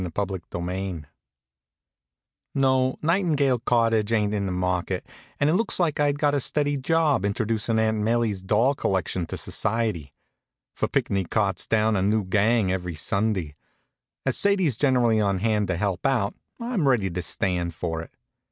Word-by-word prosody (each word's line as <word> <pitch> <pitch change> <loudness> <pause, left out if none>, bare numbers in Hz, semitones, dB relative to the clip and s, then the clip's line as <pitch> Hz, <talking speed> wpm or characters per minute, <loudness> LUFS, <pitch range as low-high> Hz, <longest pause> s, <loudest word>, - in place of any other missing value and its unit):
CHAPTER 95 -2 -2
XI 90 -1 -4 1.5
No, 130 -1 +2
Nightingale 155 -7 +2
Cottage 115 -2 +1
ain't 105 -2 +1
in 100 -2 -1
the - - -2
market, 90 0 -1 0.3
and 145 - +3
it 155 - +3
looks 220 +2 +1
like 165 -5 +1
I'd 145 -1 +2
got 145 0 +2
a 145 - +2
steady 145 +2 0
job 150 - +1
introducin' 110 +2 -1
Aunt 110 0 +1
'Melie's 110 -2 0
doll 110 +8 +2
collection 95 -7 -2
to - - -5
society; 110 - -1 0.6
for - - -1
Pinckney 95 -2 0
carts 100 -2 -1
down 110 0 +2
a 95 - +1
new 105 +2 +1
gang 105 +1 +2
every 90 -2 -3
Sunday. 95 -2 -1 0.7
As - - +1
Sadie's 190 - +3
generally 120 -4 +3
on 100 -2 +1
hand 105 0 0
to 95 - -1
help 95 -1 -2
out, 120 -7 +1 0.3
I'm 235 - -1
ready 110 -8 +2
to 90 +1 -3
stand 90 -2 -1
for 80 0 -3
it. 80 - -10
110 Hz, 155 wpm, -25 LUFS, 95-130 Hz, 1.5 s, and